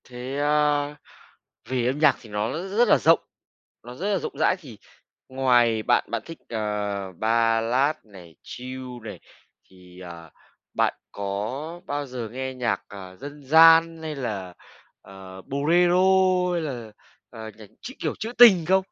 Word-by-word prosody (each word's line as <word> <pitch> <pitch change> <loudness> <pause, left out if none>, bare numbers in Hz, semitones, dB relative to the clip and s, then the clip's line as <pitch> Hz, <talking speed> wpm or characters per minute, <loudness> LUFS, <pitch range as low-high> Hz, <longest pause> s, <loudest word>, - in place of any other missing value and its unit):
Thế, 125 +2 -6
a, 145 0 +1 0.7
vì 125 -2 -1
âm 130 +3 -1
nhạc 150 -2 +4
thì 110 - -15
nó 105 +2 -2
r 190 +5 -6
rất 240 0 +4
là - - +5
rộng, 165 +1 +4 0.6
nó 120 +1 -9
rất 200 +10 -3
là 195 - +1
rộng - - -5
rãi 185 - +2
thì 125 - -13 0.5
ngoài 120 -4 +2
bạn - - +2
bạn 115 -2 -3
thích, 165 - -10
ờ, 105 -3 -3
ballad 115 - +1
này, 90 -6 -15
chill 130 +1 -8 0.2
này, 105 - -8 0.5
thì, 90 -1 -16
à, 85 -2 -11 0.4
bạn - - +1 0.2
có 110 - -5
bao 145 -2 -3
giờ 125 -3 -6
nghe 130 +1 -5
nhạc, 125 -2 -2
à, 95 -2 -11
dân 145 +5 -10
gian 165 +2 +6
hay 155 -1 -5
là, 100 -9 -5 0.5
ờ, 95 -1 -12
bolero 170 - +2 0.6
hay 175 - -1
là, 120 -8 -6 0.4
à, 110 -2 -9
nhạc 110 -1 -13
trữ, 255 +4 -9
kiểu, - - -3
trữ 225 +2 -5
tình 205 -9 +8
không? 190 +2 +3
125 Hz, 160 wpm, -24 LUFS, 105-155 Hz, 0.7 s, tình